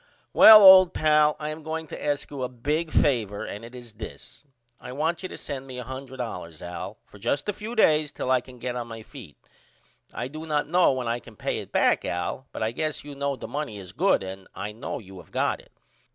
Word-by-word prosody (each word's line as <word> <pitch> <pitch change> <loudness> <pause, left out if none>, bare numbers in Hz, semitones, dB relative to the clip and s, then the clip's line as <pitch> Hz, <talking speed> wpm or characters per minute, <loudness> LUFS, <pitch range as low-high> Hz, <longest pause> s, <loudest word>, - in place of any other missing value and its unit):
Well 215 -1 +10
old 185 -2 +9
pal 150 -1 +4
I 150 0 -4
am 155 +1 -7
going 160 +1 -4
to - - -8
ask 145 -1 -2
you 140 -2 -6
a 125 - -2
big 150 +7 -2
favor 110 -7 +1
and 105 - -7
it 120 +2 -11
is 120 -3 -11
this 110 +7 -10 0.4
I 125 - -9
want 160 +5 -1
you 185 - -5
to - - -8
send 135 -2 -6
me 130 -1 -8
$100 125 - -7
Al 85 -1 -7
for 100 - -16
just 140 +8 -1
a 210 - 0
few 215 +4 -7
days 155 -8 +3
till 130 - -3
I 130 -1 +4
can 125 0 -14
get 125 0 -4
on 120 -1 -4
my 115 -1 -8
feet. 110 - -12 0.7
I 120 - -4
do 155 +4 -8
not 150 -2 0
know 175 +1 +4
when 130 -2 -3
I 120 +1 -1
can 120 -2 -15
pay - - -2
it - - -9
back - - +3
Al 90 +10 -3
but - - -4
I 110 - 0
guess 155 +5 -3
you 145 0 -9
know 140 0 -2
the - - -8
money 145 -7 -4
is 95 -3 -9
good - - +2
and 95 0 -8
I 100 +2 -5
know 110 +3 -5
you 95 -3 -11
have 85 - -15
got - - 0
it. - - -24
130 Hz, 235 wpm, -26 LUFS, 115-150 Hz, 0.7 s, Well